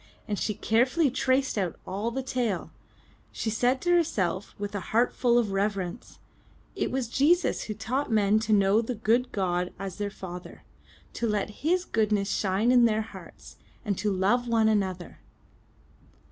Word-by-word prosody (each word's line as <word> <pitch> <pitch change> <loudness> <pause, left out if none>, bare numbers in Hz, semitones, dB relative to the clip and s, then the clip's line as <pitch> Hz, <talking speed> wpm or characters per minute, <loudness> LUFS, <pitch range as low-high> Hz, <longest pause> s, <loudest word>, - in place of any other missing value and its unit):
As 205 -2 -2
she 210 - -1
carefully 255 - +2
traced 260 -2 +1
out 180 -4 -1
all 200 +5 -2
the 260 +3 -4
tale, 240 -8 -2 0.6
she 220 - -3
said 245 +4 +1
to 350 - +1
herself 205 - 0
with 205 0 -5
a 205 - -2
heart 235 +3 +2
full 240 -1 +2
of 225 -4 +1
reverence: 195 0 -3 0.6
*'It - - -1
was 260 -2 -2
Jesus 310 +9 +2
who 215 - -5
taught 255 +5 -2
men 210 -1 +3
to 220 0 -3
know 200 +1 +4
the 235 +2 -4
good 230 +3 +1
God 180 -2 -1
as 195 -1 -6
their 205 -1 -2
father, 180 -2 -9 0.5
to 235 - -2
let 210 -1 -1
His 355 +4 +1
goodness 210 -5 0
shine 205 +4 +1
in 245 -1 +6
their 220 -1 +2
hearts, 220 - -13 0.3
and 205 -2 0
to 210 +1 0
love 205 +6 +1
one 225 -2 +3
another." 190 -5 -1
220 Hz, 165 wpm, -27 LUFS, 200-245 Hz, 0.6 s, in